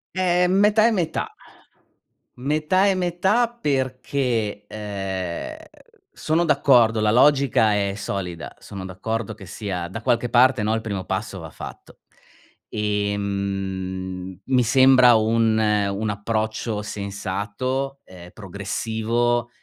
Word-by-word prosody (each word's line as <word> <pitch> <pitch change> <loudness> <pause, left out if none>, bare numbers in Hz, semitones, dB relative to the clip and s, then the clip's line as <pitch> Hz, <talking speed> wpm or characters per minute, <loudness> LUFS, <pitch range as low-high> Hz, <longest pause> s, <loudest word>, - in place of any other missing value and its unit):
Ehm, 180 -1 +2
metà 210 +1 +5
e - - +3
metà. 170 -6 -2 1.0
Metà 155 +8 +1
e 195 - +4
metà 185 +6 +1
perché, 130 - -2
ehm, 95 - -5 0.6
sono 160 +2 0
d'accordo, 125 -7 +4
la 105 - +2
logica 130 -4 +4
è 100 -1 0
solida, 90 -4 -5
sono 95 -2 -8
d'accordo 110 +4 -4
che 105 -3 -12
sia 90 -3 -4
da 110 +4 -7
qualche 120 +1 +1
parte 125 -1 +4
no, 110 +1 +1
il 115 - -2
primo 100 -4 -4
passo 95 0 -3
va 80 -2 -8
fatto. - - -11 0.7
Ehm, 95 -3 -3
mi 130 -2 +3
sembra 130 0 +6
un 110 0 +2
un 105 -1 +1
approccio 110 +1 -2
sensato, 105 +7 -4
ehm, 90 -1 -13
progressivo 115 +4 -1
110 Hz, 115 wpm, -23 LUFS, 100-130 Hz, 1.0 s, sembra